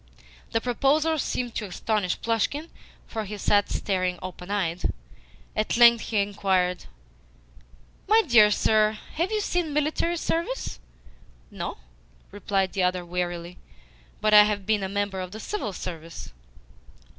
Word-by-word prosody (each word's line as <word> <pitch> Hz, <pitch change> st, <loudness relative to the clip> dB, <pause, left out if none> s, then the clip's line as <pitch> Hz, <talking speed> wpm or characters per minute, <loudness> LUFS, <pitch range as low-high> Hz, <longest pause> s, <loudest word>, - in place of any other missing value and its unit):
The 225 Hz, -, +2 dB
proposal 290 Hz, +6 st, +1 dB
seemed 245 Hz, -2 st, -2 dB
to 215 Hz, -, -3 dB
astonish 200 Hz, 0 st, -1 dB
Plushkin, 255 Hz, +8 st, -1 dB, 0.4 s
for 220 Hz, -, -4 dB
he 210 Hz, +1 st, -6 dB
sat 205 Hz, +1 st, +2 dB
staring 185 Hz, -2 st, -1 dB
open 180 Hz, 0 st, -8 dB
eyed. 180 Hz, -4 st, -1 dB, 0.6 s
At 215 Hz, +2 st, 0 dB
length 235 Hz, -1 st, +7 dB
he 220 Hz, -, -2 dB
inquired: 190 Hz, -3 st, 0 dB, 1.2 s
"My 440 Hz, +2 st, +5 dB
dear 235 Hz, -8 st, +6 dB
sir, 215 Hz, 0 st, +2 dB, 0.2 s
have 340 Hz, +5 st, -1 dB
you 430 Hz, -1 st, 0 dB
seen 350 Hz, -6 st, -1 dB
military 310 Hz, +3 st, 0 dB
service?" 340 Hz, +10 st, -2 dB, 0.7 s
"No," -, -, -5 dB, 0.5 s
replied 195 Hz, -2 st, -1 dB
the 195 Hz, -, 0 dB
other 180 Hz, -1 st, 0 dB
warily, 175 Hz, 0 st, -4 dB, 0.6 s
"but 215 Hz, 0 st, +2 dB
I 210 Hz, 0 st, +10 dB
have 205 Hz, -2 st, -2 dB
been 215 Hz, 0 st, +1 dB
a 190 Hz, -, -3 dB
member 200 Hz, -1 st, -2 dB
of 185 Hz, +1 st, -7 dB
the 220 Hz, -, -7 dB
CIVIL 395 Hz, -, -3 dB
Service." 165 Hz, -2 st, -7 dB
210 Hz, 135 wpm, -26 LUFS, 185-245 Hz, 1.2 s, I